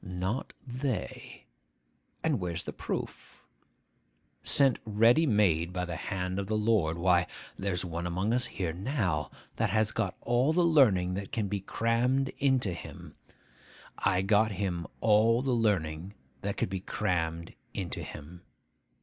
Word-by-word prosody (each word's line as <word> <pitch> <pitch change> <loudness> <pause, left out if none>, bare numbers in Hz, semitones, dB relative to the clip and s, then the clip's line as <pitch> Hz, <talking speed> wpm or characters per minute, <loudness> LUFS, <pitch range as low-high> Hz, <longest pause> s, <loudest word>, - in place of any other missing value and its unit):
'Not 95 +6 -3
they. 130 -1 -4 0.8
And 155 -7 +1
where's 90 -2 -3
the - - -6
proof? - - -6 1.0
sent 135 -3 +4
ready 115 +9 +4
made 90 - +2
by 90 0 -2
the 85 -2 -5
hand 90 +2 -3
of 100 - -3
the 110 +1 0
Lord. 105 -7 +2
Why, 90 0 +3 0.3
there's 95 -2 -2
one 85 0 -3
among 95 +6 0
us 125 0 +3
here 90 -8 -3
now, 95 - -1 0.3
that 115 -1 +1
has 110 +1 +2
got - - -2
all 125 +6 +2
the 175 +1 +3
learning 105 - +4
that 100 +1 -5
can 110 -3 -1
be 100 +1 -2
crammed 120 +6 +1
into 130 -9 +2
him. - - -10 0.9
I 95 +1 +2
got 105 +2 +3
him 90 -4 -2
all 115 +3 +4
the 135 - 0
learning 95 -5 0 0.3
that 100 0 -3
could - - 0
be 95 - -2
crammed 85 -2 -2 0.2
into - - -3
him. 80 +4 -9
100 Hz, 145 wpm, -30 LUFS, 90-115 Hz, 1.0 s, sent